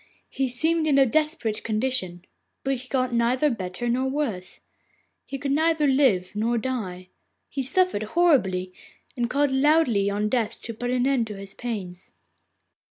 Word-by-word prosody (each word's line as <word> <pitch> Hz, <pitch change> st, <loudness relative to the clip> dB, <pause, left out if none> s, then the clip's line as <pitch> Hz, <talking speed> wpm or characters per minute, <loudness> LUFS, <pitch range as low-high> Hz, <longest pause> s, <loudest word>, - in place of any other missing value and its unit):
He 270 Hz, -1 st, -1 dB
seemed 320 Hz, +5 st, +1 dB
in 285 Hz, -2 st, +3 dB
a 270 Hz, -, +6 dB
desperate 300 Hz, -5 st, 0 dB
condition, 215 Hz, -6 st, -2 dB, 0.4 s
but 270 Hz, -, 0 dB
he 255 Hz, -1 st, -6 dB
got 255 Hz, -2 st, 0 dB
neither 250 Hz, +5 st, +2 dB
better 185 Hz, +1 st, -4 dB
nor 255 Hz, +3 st, +1 dB
worse. 230 Hz, -11 st, -3 dB, 0.7 s
He 275 Hz, -, -5 dB
could 275 Hz, 0 st, -3 dB
neither 315 Hz, +1 st, +2 dB
live 260 Hz, -10 st, +3 dB
nor 230 Hz, +3 st, 0 dB
die; 205 Hz, -8 st, -4 dB, 0.4 s
he 275 Hz, -, -3 dB
suffered 315 Hz, -, +1 dB, 0.2 s
horribly, 190 Hz, -, +3 dB, 0.4 s
and 240 Hz, -2 st, -1 dB
called 285 Hz, 0 st, +1 dB
loudly 265 Hz, -7 st, +3 dB
on 205 Hz, +1 st, -1 dB
Death 225 Hz, -1 st, -1 dB
to 230 Hz, -, -5 dB
put 245 Hz, +2 st, -4 dB
an 250 Hz, 0 st, +1 dB
end 265 Hz, -4 st, +1 dB
to 210 Hz, -2 st, -7 dB
his 195 Hz, 0 st, -8 dB
pains. 195 Hz, -7 st, -6 dB
245 Hz, 160 wpm, -25 LUFS, 210-275 Hz, 0.7 s, a